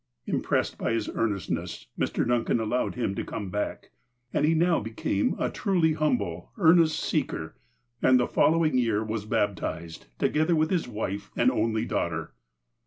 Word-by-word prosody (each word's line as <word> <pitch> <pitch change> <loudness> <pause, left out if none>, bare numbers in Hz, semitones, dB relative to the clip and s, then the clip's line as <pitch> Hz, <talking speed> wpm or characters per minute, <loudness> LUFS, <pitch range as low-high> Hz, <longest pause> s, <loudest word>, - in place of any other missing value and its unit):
Impressed - - -1
by - - 0
his 115 -2 -1
earnestness, 90 - -2
Mr. - - -1
Duncan 120 -1 +1
allowed 115 +3 -1
him 120 -5 -1
to - - -3
come 100 -4 -5
back, 105 +2 -3 0.4
and - - +2
he 165 - +3
now 170 +1 +3
became 105 -2 -1
a - - -1
truly 175 -6 +2
humble, 120 - -1
earnest 165 -1 +5
seeker, - - -2 0.5
and 130 -1 +5
the 125 - +2
following 155 -4 +3
year 110 -3 +1
was 110 -1 -3
baptized, 85 - -2
to - - +2
gether 155 +3 +2
with 155 0 +1
his 175 -7 0
wife 105 -3 -4
and 125 +2 +3
only 110 -2 0
daughter. 85 -7 -2
115 Hz, 160 wpm, -27 LUFS, 100-155 Hz, 0.5 s, earnest